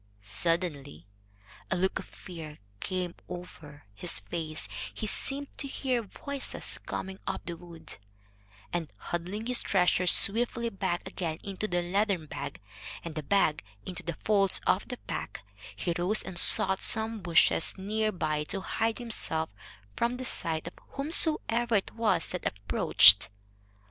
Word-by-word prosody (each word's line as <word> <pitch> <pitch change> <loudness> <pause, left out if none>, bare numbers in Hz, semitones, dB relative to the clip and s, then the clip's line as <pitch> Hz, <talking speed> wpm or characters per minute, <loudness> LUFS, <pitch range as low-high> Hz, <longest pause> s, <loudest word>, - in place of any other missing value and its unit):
Suddenly 140 - -2 0.6
a - - +1
look 190 +2 0
of - - -8
fear 160 -4 -10 0.2
came 180 -2 -3 0.2
over 160 -5 -10
his 170 +12 -5
face; 155 - -5 0.2
he - - -5
seemed 275 +6 -3
to 280 - -1
hear 260 -3 -1
voices 275 +6 -5
coming 190 0 -6
up - - -3
the 170 - -4
wood, 165 -7 -9 0.7
and, 170 -4 -3
huddling 180 - -4
his 250 0 +1
treasure 180 -1 +2
swiftly 235 +5 +3
back 190 -4 -3
again 170 -4 -4
into 200 +1 -3
the 175 -2 0
leathern 195 -1 0
bag, - - -7 0.4
and 170 - -6
the 155 - -4
bag 155 -1 +1 0.2
into 180 - -5
the 170 -1 -5
folds 200 -3 +3
of - - +2
his - - -5
pack, - - -5 0.3
he 175 - -2
rose 195 +5 +3
and 175 -2 -1
sought 190 +2 +7
some 220 -1 +2
bushes 170 -2 +3
near 215 +3 -1
by 155 -5 -1
to 195 +5 -2
hide 225 +3 -1
himself 160 -9 -1 0.4
from 240 +1 0
the 255 - -5
sight 160 -9 0
of 170 - -7 0.2
whomsoever 275 -6 +2
it 200 - 0
was 225 -2 +1
that 180 - -3
approached. 100 0 +7
185 Hz, 145 wpm, -29 LUFS, 165-220 Hz, 0.7 s, sought